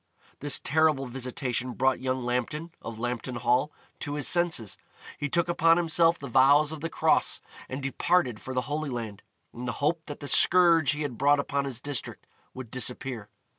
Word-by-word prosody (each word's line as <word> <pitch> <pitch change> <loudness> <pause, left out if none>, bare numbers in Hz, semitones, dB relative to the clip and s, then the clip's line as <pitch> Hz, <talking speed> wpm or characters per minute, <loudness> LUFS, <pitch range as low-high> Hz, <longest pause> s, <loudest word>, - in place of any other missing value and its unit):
This 145 -1 +1
terrible 155 -2 +2
visitation 125 0 -3
brought 130 +2 +1
young 130 0 -2
Lambton, 125 +7 -3
of 115 -1 -7
Lambton 120 +1 -4
Hall, 125 +5 +1 0.3
to 145 -1 -3
his 145 - -1
senses. 170 - +2 0.4
He 145 0 -2
took 170 +5 +1
upon 165 -1 +3
himself 165 0 +3
the 140 - -8
vows 140 +4 +4
of 160 -2 -7
the 165 - -3
Cross, - - +1 0.3
and 130 +1 -5
departed 135 -3 0
for 130 - -7
the 125 - +1
Holy 145 +4 -3
Land, 115 -5 -6 0.3
in 120 +1 -7
the 125 - -2
hope 160 +3 -1
that 145 - -7
the 145 - -7
scourge 170 -2 +5
he 150 +1 -3
had 130 -6 -5
brought 145 +1 +4
upon 140 0 -1
his 130 -4 -5
district 145 0 -4 0.3
would 130 -3 -8
disappear. 125 -3 -3
135 Hz, 180 wpm, -27 LUFS, 125-155 Hz, 0.4 s, scourge